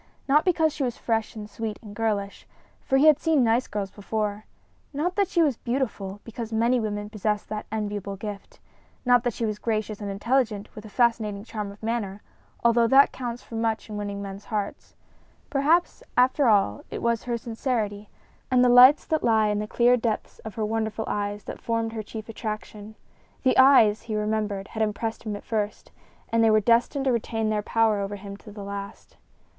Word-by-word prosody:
Not 295 +3 +4
because 320 -4 +2
she 305 - -6
was 245 -3 -1
fresh 225 -1 -1
and 210 -1 -7
sweet 215 0 -5
and 205 -2 -10
girlish, 205 -3 -2 0.4
for 270 - +2
he 280 - +4
had 305 -2 +7
seen 315 -5 +3
nice 235 +2 +2
girls 200 -2 -4
before; 210 0 -3 0.5
not 340 +6 -1
that 400 -1 +2
she 340 - +2
was 280 -7 +1
beautiful, 215 -6 -3
because 230 0 -7
many 235 +3 +2
women 205 -2 -3
possess 210 0 -1
that 215 0 -6
enviable 205 -2 -3
gift; 205 0 -8 0.5
not 245 -1 +5
that 245 -2 0
she 230 - -2
was 210 -1 -3
gracious 215 -2 -2
and 205 - -4
intelligent, 215 0 -1
with 210 - -10
a - - -9
fascinating 215 -3 +1
charm 210 -3 -5
of 200 +2 -16
manner, 215 -3 -3 0.4
although 235 0 +4
that 270 +4 +6
counts 245 -1 -5
for - - -15
much 225 -1 -2
in - - -5
winning 200 -1 -4
men's 195 0 -8
hearts. 210 -3 -4 0.6
Perhaps, 305 +5 +2 0.2
after 255 +2 +4
all, 195 - +3
it - - -6
was 235 -1 0
her 240 -1 -1
sincerity 225 -3 -3 0.4
and 250 -1 +4
the - - +5
lights 250 +4 +8
that 315 -1 0
lay 220 -2 +3
in 210 - 0
the 210 - -3
clear 245 +2 +4
depths 225 -2 -3
of 220 - -9
her 220 - -1
wonderful 220 0 -2
eyes 205 0 -2
that - - -8
formed 230 -1 -1
her 220 - -3
chief 215 +1 -8
attraction. 215 -1 -6 0.5
The 260 - +3
eyes, 260 -6 +6
he 225 -2 -5
remembered, 210 -2 -2
had 220 - -4
impressed 220 +1 -2
him 210 - -2
at 205 - -9
first, 210 -2 -3 0.4
and 230 0 +2
they 225 - +5
were 215 0 +5
destined 240 +5 +2
to 265 - +3
retain 225 -2 -1
their 210 -1 0
power 220 -1 +2
over 200 +1 -3
him 200 0 -8
to 210 +1 -13
the 205 -1 -8
last. 200 0 -8
220 Hz, 195 wpm, -25 LUFS, 210-240 Hz, 0.6 s, lights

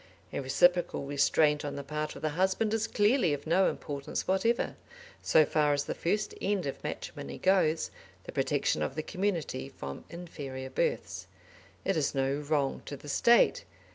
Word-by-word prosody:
A - - -1
reciprocal 175 +4 +2
restraint 145 +1 +3
on 145 -1 -4
the 140 - -5
part 150 +2 -4
of - - -10
the 155 - +1
husband 190 +7 +1
is 225 0 0
clearly 205 - +3
of 145 - -11
no 180 +4 +4
importance 140 -1 -4
whatever, 225 +6 +1 0.5
so 155 - +5
far 150 0 +2
as 145 0 0
the - - -2
first 205 +5 -1
end 200 -4 0
of 135 - -5
matrimony 70 0 -6
goes, 180 -4 +2 0.3
the - - -8
protection 75 - 0
of 75 - -2
the 155 - -2
community 180 - -2
from 70 0 -8
inferior 140 -6 -7
births. - - -2 0.6
It 195 - +1
is 150 -3 0
no 135 +1 +1
wrong 145 -2 0
to 145 - -5
the 145 - -11
State. 235 +11 +4
155 Hz, 170 wpm, -30 LUFS, 140-190 Hz, 0.6 s, so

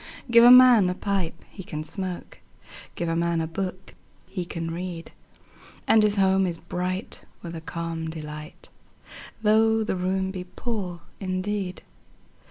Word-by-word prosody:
Give 235 0 +8
a 240 - +9
man 250 -6 +8
a 180 - -2
pipe 190 -4 -2
he 190 - -9
can 155 -3 -5
smoke, 180 +2 -6 0.2
5 - - -22 0.2
Give 170 -1 -2
a 165 - 0
man 170 0 +1
a 160 - 0
book 185 +3 -5 0.3
he 180 -3 -5
can 165 -1 -4
read: 170 -1 -6 0.8
And 220 - +6
his 210 -1 +3
home 190 -1 +3
is 170 -2 -3
bright 180 +3 -4 0.2
with 170 -1 -6
a 160 - -6
calm 165 0 -4
delight, 155 -1 -8 0.7
Though 220 +1 +4
the 210 - -1
room 190 +1 -1
be 185 -1 -5
poor 185 -4 -5 0.2
indeed. 190 0 -3
185 Hz, 155 wpm, -25 LUFS, 170-200 Hz, 0.8 s, a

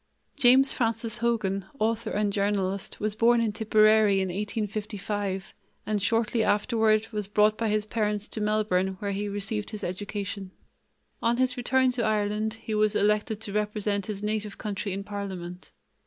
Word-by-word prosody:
James 265 +2 +5
Francis 230 -2 -1
Hogan, 210 -5 0
author 225 0 0
and 205 -1 0
journalist, 200 -1 -1
was 210 0 0
born 235 +2 +4
in 230 -2 +1
Tipperary 215 -1 +4
in 190 -1 -1
1855 205 -1 -3 0.3
and 210 -1 -1
shortly 225 +2 +1
afterward 220 0 +2
was 210 -3 -3
brought 210 +1 +3
by 225 -1 -1
his 210 0 +1
parents 210 -2 -1
to 215 - -5
Melbourne 210 -3 +1
where 200 +1 -3
he 205 +1 -2
received 205 +1 -2
his 215 -2 -7
education. 200 +1 -4 0.7
On 235 +1 +2
his 255 0 +2
return 260 +1 +2
to 245 -2 -2
Ireland 215 0 0
he 220 0 -6
was 215 0 +2
elected 210 +1 +1
to 205 -2 -5
represent 210 -1 -1
his 205 -1 -5
native 210 -1 -2
county 205 -1 -3
in 195 +1 -3
parliament. 190 -3 -6
210 Hz, 155 wpm, -27 LUFS, 200-220 Hz, 0.7 s, James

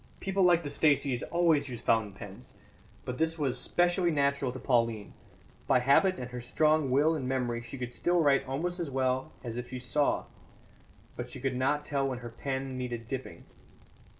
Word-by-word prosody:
"People 195 0 -1
like 175 -2 +5
the 145 - -4
Staceys 140 -5 +2
always 165 -5 +2
use 120 -2 -6
fountain 110 -3 +1
pens; 100 - -11 0.5
but 125 - -5
this 160 +1 +1
was 135 -5 0
specially 175 +3 +2
natural 140 -3 +1
to 130 - -7
Pauline. 115 -5 0 0.5
By - - +5
habit 140 +9 +4
and 125 0 -6
her 125 0 -5
strong 155 +3 +2
will 145 +5 +3
and 140 -5 -3
memory 120 -3 -1
she 120 +3 -9
could 125 -1 -5
still 175 0 +1
write 140 -3 +3
almost 175 +7 -2
as 170 -4 -2
well 130 -1 0
as 120 -2 -5
if 125 0 -5
she 130 - -5
saw; 125 +4 0 0.9
but - - -6
she - - -9
could 135 0 -1
not 145 +3 0
tell 140 -2 0
when 130 -2 -3
her - - -5
pen 130 +1 -4
needed 120 -2 -4
dipping. 125 -10 -6
135 Hz, 185 wpm, -30 LUFS, 125-155 Hz, 0.9 s, like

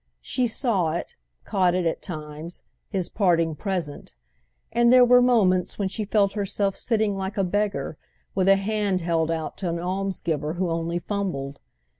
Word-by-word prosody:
She 250 -1 0
saw 205 - 0
it, 170 - -4 0.3
caught 185 -3 +2
it, 180 -1 0
at 165 - -1
times, 155 0 -7 0.3
his 190 -4 -1
parting 170 -5 +2
present; 165 - -4 0.6
and 235 0 +4
there 250 -1 +8
were 250 0 +6
moments 200 -8 +3
when 200 -2 -1
she 215 +2 -3
felt 200 -1 +2
herself 200 -1 -1
sitting 220 -3 0
like 190 +1 -4
a 195 - +2
beggar 200 -4 -1 0.3
with 190 0 +2
a 195 - +8
hand 200 -1 0
held 165 -1 0
out 160 -1 -3
to 170 -3 -2
almsgiver 175 -4 -2
who 175 0 -1
only 165 +1 -1
fumbled. 175 -8 -3
190 Hz, 160 wpm, -25 LUFS, 170-205 Hz, 0.6 s, there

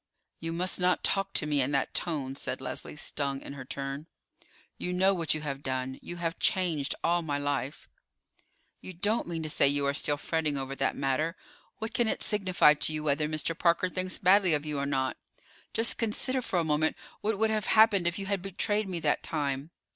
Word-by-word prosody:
"You 165 0 -3
must 180 +3 0
not 180 0 +2
talk 195 0 +1
to - - +3
me 145 -2 +2
in 130 - 0
that 140 - 0
tone," 140 -6 -1
said - - -4
Leslie, 130 +2 -6
stung 140 -2 -2
in 140 - -8
her 135 -2 -7
turn. 135 +3 -5 0.7
"You 180 - -2
know 190 +2 +4
what 165 -4 +1
you 155 - -4
have 140 -2 -4
done. 130 -1 -3
You 175 - -7
have 170 -1 -3
changed 165 -7 +1
all 175 +1 +3
my 145 -3 -1
life." 145 -1 -2 0.9
"You 185 - -8
don't 205 +6 0
mean 165 -2 -3
to - - -3
say 145 - +4
you 140 0 +1
are 140 - +1
still 145 0 -1
fretting 150 -1 -1
over 135 0 -4
that - - 0
matter. 140 +5 0 0.4
What 220 +1 -5
can 240 - +2
it - - -1
signify 185 -7 +4
to 150 - 0
you 155 0 -3
whether 150 0 +1
Mr. 155 +1 -1
Parker 170 +2 +2
thinks 185 0 -2
badly 185 -2 +5
of 150 0 -3
you 150 -2 -2
or 140 - -1
not. 130 -2 0 0.5
Just 225 +1 0
consider 255 +4 0
for 190 - -2
a 170 - +3
moment 155 0 +1 0.2
what 215 0 -1
would 220 +1 +2
have 215 -1 0
happened 215 -5 +5
if 175 - 0
you 195 - -4
had 200 -1 -1
betrayed 200 +2 -1
me 175 -2 -2
that 150 - +1
time." 140 -1 -2
160 Hz, 210 wpm, -29 LUFS, 140-185 Hz, 0.9 s, badly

